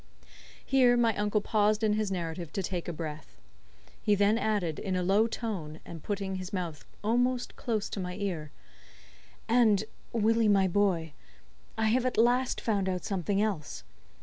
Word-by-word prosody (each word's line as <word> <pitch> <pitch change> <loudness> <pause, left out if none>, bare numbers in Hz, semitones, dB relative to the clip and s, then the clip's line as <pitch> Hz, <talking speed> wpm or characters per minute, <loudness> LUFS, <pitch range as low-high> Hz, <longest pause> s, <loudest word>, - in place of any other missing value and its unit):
Here 250 -2 +4
my 230 -3 +3
uncle 210 0 +1
paused 215 0 +2
in 215 -1 +3
his 210 -2 -1
narrative 170 -2 -4
to 195 - -2
take 180 -1 -3
breath. 155 - -7 0.6
He 210 - +3
then 205 +2 +3
added, 200 -9 0
in 190 -2 -2
a 180 - 0
low 200 +5 +3
tone, 190 -10 -4
and 165 -2 -9
putting 195 0 -3
his 185 +1 -6
mouth 175 -6 -4 0.2
almost 245 +3 +1
close 220 -3 -2
to - - -5
my 180 -1 -4
ear: 180 -7 -3 1.0
"And, 225 -4 +4 0.3
Willie, 225 0 +2
my 195 -2 +4
boy, 175 -5 +1 0.6
I 220 0 +2
have 255 +3 +2
at 250 - -2
last 245 +3 +3
found 200 -4 0
out 180 -1 -3
something 195 0 -1
else. 155 - -3
205 Hz, 160 wpm, -29 LUFS, 180-220 Hz, 1.0 s, Here